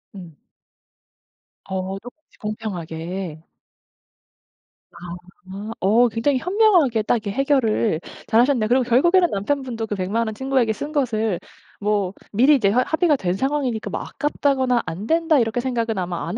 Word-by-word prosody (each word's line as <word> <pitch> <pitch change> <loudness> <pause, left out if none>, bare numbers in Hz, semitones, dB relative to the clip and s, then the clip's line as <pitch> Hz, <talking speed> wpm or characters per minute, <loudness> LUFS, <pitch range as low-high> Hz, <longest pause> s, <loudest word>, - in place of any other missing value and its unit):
음. 170 -6 -11 1.3
어 190 0 -3
조금씩 245 +8 -15
공평하게. 180 -5 -5 1.5
아 - - -17
아 185 +3 -9
어 225 +6 +4
굉장히 235 +5 +1
현명하게 360 - +3
딱 240 - +2
이렇게 210 -3 -3
해결을 230 - +1 0.3
잘하셨네요. 235 0 +3
그리고 250 +3 +3
결국에는 345 +10 +4
남편분도 230 +2 -2
그 205 - -3
100 185 -1 -3
만 230 +1 +1
원 220 - -4
친구에게 260 -3 +1
쓴 290 +8 -6
것을 225 - 0 0.4
뭐 205 -2 0 0.2
미리 260 +8 +5
이제 220 -8 +2
합 245 +5 +3
합의가 315 -2 +3
된 180 -8 -1
상황이니까 260 0 -1
뭐 - - -3
'아깝다거나 265 -4 0
안 190 +7 -5
된다.' 325 -1 +3
이렇게 230 0 0
생각은 235 -4 -1
아마 175 -2 -3
안 220 - -3
225 Hz, 310 characters per minute, -22 LUFS, 195-270 Hz, 1.5 s, 미리